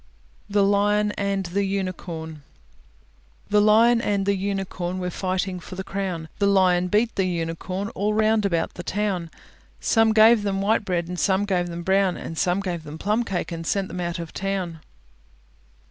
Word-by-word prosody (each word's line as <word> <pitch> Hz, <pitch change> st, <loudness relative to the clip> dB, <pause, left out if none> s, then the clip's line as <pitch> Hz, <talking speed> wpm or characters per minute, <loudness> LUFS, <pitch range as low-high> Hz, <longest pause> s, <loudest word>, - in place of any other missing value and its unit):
THE 200 Hz, 0 st, +3 dB
LION 205 Hz, +1 st, +2 dB
AND 200 Hz, -1 st, -2 dB
THE 190 Hz, +4 st, -1 dB
UNICORN 180 Hz, -5 st, -4 dB, 1.1 s
The 210 Hz, 0 st, +5 dB
Lion 230 Hz, +3 st, +5 dB
and 200 Hz, -3 st, 0 dB
the 200 Hz, 0 st, +2 dB
Unicorn 190 Hz, -2 st, -3 dB
Were 180 Hz, -1 st, -3 dB
fighting 185 Hz, 0 st, -2 dB
for 180 Hz, -, -10 dB
the 190 Hz, -, -4 dB
crown; 190 Hz, -5 st, -4 dB
The 200 Hz, -, +3 dB
Lion 185 Hz, -2 st, +3 dB
beat 215 Hz, +5 st, +1 dB
the 190 Hz, -1 st, +1 dB
unicorn 180 Hz, +3 st, -3 dB
All 210 Hz, -1 st, -1 dB
round 215 Hz, 0 st, +3 dB
about 170 Hz, -5 st, 0 dB
the -, -, -7 dB
town. 185 Hz, -2 st, -2 dB, 0.5 s
Some 225 Hz, -1 st, +3 dB
gave 220 Hz, +1 st, +6 dB
them 200 Hz, -1 st, -1 dB
white 210 Hz, +2 st, +1 dB
bread, 175 Hz, -3 st, -1 dB
And 180 Hz, 0 st, -5 dB
some 195 Hz, +1 st, +2 dB
gave 180 Hz, -3 st, 0 dB
them 170 Hz, 0 st, -6 dB
brown; 190 Hz, -3 st, 0 dB
Some 180 Hz, +4 st, +1 dB
gave 180 Hz, -4 st, -3 dB
them 155 Hz, 0 st, -9 dB
plum 210 Hz, +7 st, 0 dB
cake, 190 Hz, -6 st, -3 dB
And 165 Hz, -1 st, -4 dB
sent 195 Hz, -2 st, 0 dB
them 180 Hz, -, -5 dB
out 170 Hz, -1 st, -2 dB
of 170 Hz, -1 st, -7 dB
town. 190 Hz, -4 st, -3 dB
195 Hz, 175 wpm, -24 LUFS, 175-205 Hz, 1.1 s, gave